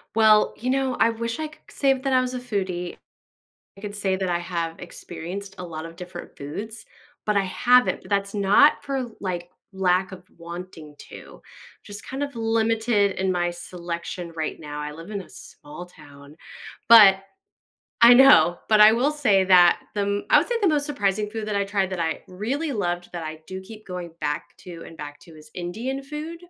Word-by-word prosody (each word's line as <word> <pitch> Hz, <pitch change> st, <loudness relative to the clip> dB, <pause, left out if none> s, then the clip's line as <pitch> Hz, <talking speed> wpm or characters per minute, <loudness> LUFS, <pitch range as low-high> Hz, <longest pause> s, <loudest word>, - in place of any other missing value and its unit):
Well, 215 Hz, -1 st, +5 dB
you 250 Hz, +3 st, -3 dB
know, 265 Hz, -1 st, 0 dB
I 230 Hz, -, +5 dB
wish 230 Hz, +4 st, -4 dB
I 310 Hz, -, -2 dB
c -, -, -14 dB, 0.2 s
could -, -, -16 dB
say 275 Hz, -1 st, +2 dB
that 265 Hz, 0 st, -2 dB
I 255 Hz, -, +5 dB
was 255 Hz, 0 st, -3 dB
a 250 Hz, -, -3 dB
foodie, 185 Hz, -7 st, -4 dB, 0.8 s
I -, -, -13 dB
could 205 Hz, -1 st, -6 dB
say 195 Hz, -2 st, 0 dB
that 190 Hz, -1 st, -2 dB
I 175 Hz, 0 st, 0 dB
have 170 Hz, -2 st, -4 dB
experienced 180 Hz, +3 st, -8 dB
a 180 Hz, -, -7 dB
lot 160 Hz, -1 st, -7 dB
of 165 Hz, -, -10 dB
different 180 Hz, 0 st, -10 dB
foods, 215 Hz, +10 st, -7 dB, 0.4 s
but 210 Hz, -1 st, +1 dB
I 195 Hz, -, +2 dB
haven't, 250 Hz, +6 st, +3 dB
but -, -, -15 dB
that's 200 Hz, 0 st, -1 dB
not 205 Hz, +9 st, +4 dB
for, 270 Hz, -2 st, -2 dB, 0.2 s
like, 175 Hz, -2 st, -4 dB, 0.2 s
lack 185 Hz, 0 st, +1 dB
of 185 Hz, -1 st, -10 dB
wanting 170 Hz, -3 st, -9 dB
to, -, -, -12 dB, 0.4 s
just 205 Hz, 0 st, -9 dB
kind 265 Hz, +2 st, -6 dB
of 280 Hz, -3 st, -4 dB
limited 225 Hz, -2 st, +1 dB
in 190 Hz, 0 st, 0 dB
my 175 Hz, -1 st, 0 dB
selection 175 Hz, 0 st, -6 dB
right 160 Hz, -1 st, -4 dB
now. 150 Hz, -1 st, -7 dB
I 150 Hz, -, -5 dB
live 165 Hz, +5 st, -11 dB
in 200 Hz, -2 st, -4 dB
a -, -, -16 dB
small 150 Hz, +5 st, -11 dB
town, 140 Hz, -4 st, -16 dB, 0.5 s
but 205 Hz, -4 st, +9 dB, 0.8 s
I 235 Hz, +1 st, +10 dB
know, 250 Hz, -9 st, +6 dB
but 215 Hz, -1 st, +5 dB
I 215 Hz, +1 st, +9 dB
will 255 Hz, +6 st, +1 dB
say 230 Hz, -11 st, +2 dB
that 180 Hz, -2 st, +6 dB, 0.2 s
the 205 Hz, -, 0 dB
m 200 Hz, 0 st, -1 dB
I -, -, +7 dB
would -, -, +1 dB
say 485 Hz, -, -1 dB
the 395 Hz, -, +4 dB
most 295 Hz, -2 st, +1 dB
surprising 210 Hz, -7 st, -1 dB
food 220 Hz, -1 st, -5 dB
that 210 Hz, -, -2 dB
I 200 Hz, -, 0 dB
tried 195 Hz, -1 st, -1 dB
that 185 Hz, -, -4 dB
I 165 Hz, -1 st, -2 dB
really 260 Hz, -, -3 dB
loved 175 Hz, -5 st, -2 dB
that 175 Hz, -2 st, -6 dB
I 155 Hz, 0 st, -7 dB
do 190 Hz, 0 st, -6 dB
keep 215 Hz, +2 st, -13 dB
going 180 Hz, -2 st, -7 dB
back 145 Hz, 0 st, -3 dB
to 170 Hz, -2 st, -10 dB
and 165 Hz, -, -12 dB
back 145 Hz, -2 st, -9 dB
to 170 Hz, -, -16 dB
is 155 Hz, 0 st, -16 dB
Indian 225 Hz, +10 st, -4 dB
food. 305 Hz, +4 st, -7 dB
195 Hz, 205 wpm, -24 LUFS, 175-230 Hz, 0.8 s, I